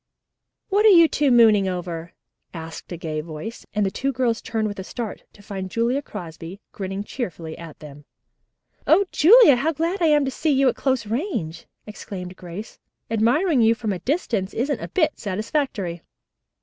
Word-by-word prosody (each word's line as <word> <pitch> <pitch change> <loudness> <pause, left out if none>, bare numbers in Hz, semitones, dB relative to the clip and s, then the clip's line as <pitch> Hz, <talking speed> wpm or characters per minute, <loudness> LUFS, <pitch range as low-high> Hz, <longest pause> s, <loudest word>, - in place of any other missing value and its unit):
"What 410 +1 +3
are - - +9
you 335 -4 +8
two 295 -2 +1
mooning 220 -5 +5
over?" 175 -2 -5 0.4
asked 160 +1 -8
a 175 - -4
gay 155 -2 -4
voice, 165 +8 -8
and 210 0 0
the 195 - -1
two 275 +6 -1
girls 245 -3 0
turned 225 -1 -2
with 205 -1 -6
a - - -4
start 225 +2 -6
to 205 - -18
find 190 -2 -5
Julia 235 +6 0
Crosby 170 - -9
grinning 195 0 -5
cheerfully 175 -9 -6
at 165 -2 -10
them. 145 -1 -12 0.8
"O 400 - +5
Julia, 390 - +7
how 310 +6 0
glad 335 +5 -2
I 335 - +4
am 295 -2 +4
to 265 - -2
see 310 +4 -1
you 275 -2 +3
at - - -2
close 260 -4 0
range!" 220 - -3 0.2
exclaimed 185 -3 -8
Grace. 180 +4 -9 0.3
"Admiring 250 - +2
you 225 0 +4
from 220 -3 -2
a 180 - -5
distance 225 - -2
isn't 270 +3 -1
a - - -4
bit 320 -5 0
satisfactory." 205 - -2
220 Hz, 175 wpm, -23 LUFS, 180-275 Hz, 0.8 s, are